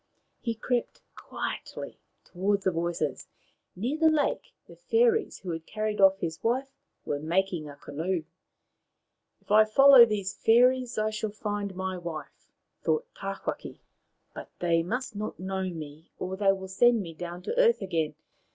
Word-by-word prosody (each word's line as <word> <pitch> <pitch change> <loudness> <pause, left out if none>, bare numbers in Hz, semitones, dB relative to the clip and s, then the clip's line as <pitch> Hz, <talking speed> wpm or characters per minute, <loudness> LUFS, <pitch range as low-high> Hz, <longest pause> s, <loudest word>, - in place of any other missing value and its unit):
He 230 -1 -3
crept 240 +2 -2
quietly - - -6 0.3
towards 195 +2 -1
the 190 - +2
voices. 165 -4 -2 0.5
Near 250 - -2
the 320 -1 +6
lake 305 -2 0
the - - -14
fairies 460 -2 +2
who 185 - -6
had 165 0 -6
carried 215 -1 -2
off 195 0 +6
his 165 -3 -4
wife 260 +4 0 0.3
were 145 - -2
making 170 0 -1
a 145 - -10
canoe. 160 +5 -3 0.6
" - - -53
If - - -12
I 215 +1 +8
follow 265 +3 +8
these 200 -3 -2
fairies 250 +3 +3
I 215 0 +1
shall 215 0 -3
find 205 -1 -4
my 190 0 -3
wife," 170 -3 -8 0.3
thought 460 +2 +1
Tawhaki; - - -5 0.3
" - - -47
but - - -9
they 170 -1 +2
must 235 +6 -3
not 210 +1 -5
know 190 0 -2
me, 155 -1 -9
or 185 +1 -4
they 195 0 +3
will 190 -1 -4
send 235 +5 +4
me 165 -2 -8
down 175 +2 -7
to - - -3
earth 470 -1 +4
again. 165 -5 -1
195 Hz, 160 wpm, -28 LUFS, 175-235 Hz, 0.6 s, I